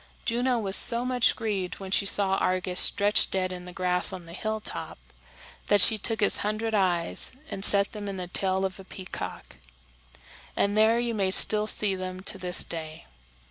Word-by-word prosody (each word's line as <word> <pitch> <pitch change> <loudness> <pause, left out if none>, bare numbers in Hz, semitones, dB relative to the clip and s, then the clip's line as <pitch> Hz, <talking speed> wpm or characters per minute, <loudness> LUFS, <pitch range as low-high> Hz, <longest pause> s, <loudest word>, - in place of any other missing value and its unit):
Juno 245 +1 -1
was 200 -3 -1
so 235 +1 +2
much 250 -1 +1
grieved 200 -5 -4
when 190 -1 -9
she 200 - +2
saw 195 -1 0
Argus 185 0 0
stretched 205 +1 +6
dead 185 -1 -2
in 180 -1 -9
the 180 - -10
grass 180 0 +1
on 180 -2 -9
the 165 - -13
hilltop, 215 +3 -5 0.7
that 205 - +3
she 215 +3 +6
took 225 +2 -2
his 205 - +3
hundred 215 +2 -3
eyes 180 -5 -2 0.2
and 195 - -6
set 200 -1 +2
them 205 -2 -8
in 195 - -7
the 180 - -5
tail 190 +1 -2
of 190 0 -6
a - - -11
peacock; 185 0 -9 1.0
and 200 +1 0
there 220 +2 +3
you 240 -1 -2
may 195 -3 -1
still 210 +2 +5
see 210 -2 +1
them 185 0 -7
to 195 0 -3
this 180 -1 +1
day. 160 -2 -8
195 Hz, 185 wpm, -25 LUFS, 185-215 Hz, 1.0 s, stretched